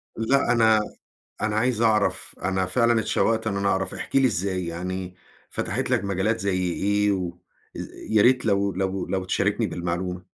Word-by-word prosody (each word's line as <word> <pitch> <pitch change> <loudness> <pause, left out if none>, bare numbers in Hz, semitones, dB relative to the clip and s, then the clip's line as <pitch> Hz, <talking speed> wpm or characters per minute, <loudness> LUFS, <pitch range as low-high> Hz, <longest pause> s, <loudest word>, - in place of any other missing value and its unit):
لأ، 120 +3 +2
أنا 110 -2 +5 0.6
أنا 110 0 0
عايز 115 0 +1
أعرف 110 -2 +1
أنا 95 0 0
فعلًا 115 +4 +2
اتشوّقت 110 0 0
إن 100 -2 -1
أنا 100 0 0
أعرف 95 0 0
إحكِ - - -4
لي 135 -1 +5
إزاي، 95 -4 -1
يعني 90 +2 -5 0.4
فتحت - - -2
لك - - +1
مجالات 100 +3 0
زي 95 -2 0
إيه، 100 +2 +1
و 90 -2 -3 0.7
يا 110 -1 +5
ريت 125 +2 +4
لو 100 -2 +1
لو 95 +1 -2
لو 95 -1 -2
تشاركني 95 - 0
بالمعلومة. 90 +1 -4
100 Hz, 160 wpm, -24 LUFS, 95-110 Hz, 0.7 s, أنا